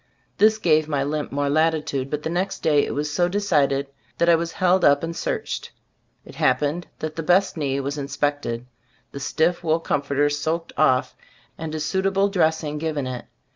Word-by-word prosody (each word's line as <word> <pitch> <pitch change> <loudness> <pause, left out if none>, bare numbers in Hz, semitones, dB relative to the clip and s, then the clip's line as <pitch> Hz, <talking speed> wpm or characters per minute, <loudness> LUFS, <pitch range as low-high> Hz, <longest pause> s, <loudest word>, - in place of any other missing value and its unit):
This 215 +1 +5
gave 155 -6 +2
my 145 -3 0
limp 150 +1 -3
more 145 0 -1
latitude, 150 -3 +1
but 150 +1 -3
the - - -2
next 185 +3 -2
day 150 -2 +4
it - - -4
was 145 0 -2
so 175 +2 +2
decided, 150 -9 +1 0.3
that 170 - +3
I - - +7
was 165 0 0
held 185 0 +2
up 145 +1 +5
and 165 0 -3
searched. - - -3 0.6
It - - -12
happened 150 +4 +1
that 155 0 -5
the 165 - -3
best 180 +4 +3
knee 140 -4 -1
was 140 +2 -3
inspected; 145 -4 -2 0.5
the 140 - -7
stiff 160 +5 0
wool 160 0 +2
comforter 145 -2 0
soaked 160 +3 -2
off, 130 -4 +2 0.4
and 160 -1 -5
a - - -2
suitable 195 +5 +1
dressing 160 -5 0
given 150 -3 -2
it. 125 -1 -5
155 Hz, 180 wpm, -23 LUFS, 145-170 Hz, 0.6 s, I